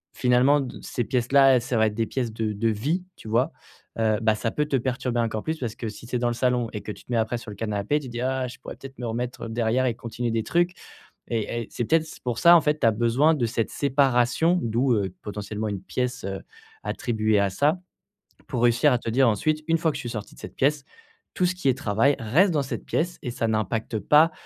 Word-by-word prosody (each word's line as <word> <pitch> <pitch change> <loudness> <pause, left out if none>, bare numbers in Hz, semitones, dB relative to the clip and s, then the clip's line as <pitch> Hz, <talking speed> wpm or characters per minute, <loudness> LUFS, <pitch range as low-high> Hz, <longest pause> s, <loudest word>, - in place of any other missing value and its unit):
finalement 125 +3 +4
d 130 - -6
ces 120 - -3
pièces-là, 130 +2 +4
ça 125 +1 -3
va 110 0 +4
être 105 - -2
des 115 0 0
pièces 120 0 -2
de 110 -1 -2
de 110 +3 0
vie, 145 - -1
tu - - -12
vois? 115 +4 +1 0.5
Heu, 110 -1 +2
bah 110 -1 +4
ça 105 +2 -2
peut 150 +6 -1
te 145 - -1
perturber 125 -1 -1
encore 110 -2 -1
plus 160 0 -3
parce 115 -4 -4
que 115 - -5
si 105 +2 -11
tu 125 - -4
es - - +1
dans 120 - +1
le - - -1
salon 125 0 +1
et 105 - -4
que - - -6
tu - - -11
te - - -12
mets 120 - +2
après 110 +2 0
sur 115 -2 -9
le - - -8
canapé, 105 +6 -1
tu 140 - -9
te - - -9
dis: 120 0 -4
«Ah 130 0 -1
je 125 - -10
pourrais - - -9
peut-être 135 -1 -11
me 125 - -5
remettre 120 0 -4
derrière 115 +3 +1
et 125 - +1
continuer 120 0 -4
des 115 - 0
trucs». 175 +9 +1 0.6
Et 115 0 -2
et - - -12
c'est 120 - -2
peut-être 160 +5 +2
c 160 - -11
pour 120 -2 -2
ça 170 0 +8
en 170 - +6
fait 150 0 0
tu 120 - +3
as - - +5
besoin 120 +8 +3
de 125 -5 0
cette 115 -1 -1
séparation, 140 +4 +2
d'où, 120 +3 +1
heu, 100 -4 -1
potentiellement 105 +1 -4
une 100 -3 -4
pièce, 125 +4 -3
heu, 95 0 -4 0.4
attribuée 110 -3 0
à 100 0 +2
ça. 145 - +1 0.7
Pour 125 -4 -2
réussir 120 +4 +4
à - - +3
te 115 - -4
dire 130 +3 +4
ensuite: 155 +8 0
«Une 165 0 +3
fois 160 0 +1
que - - -10
je - - -5
suis 120 - -5
sortie 105 -3 -6
de - - -16
cette - - -9
pièce, 145 +1 +1 0.5
tout 180 - +1
ce 180 +1 0
qui 180 -7 0
est 130 - +1
travail 135 +2 +2
reste 155 - +3
dans 150 -4 +1
cette 135 - -5
pièce 175 +2 -1
et 125 - -4
ça 115 - -1
n'impacte 110 +1 -1
pas 150 - +5
120 Hz, 260 wpm, -25 LUFS, 110-135 Hz, 0.7 s, ça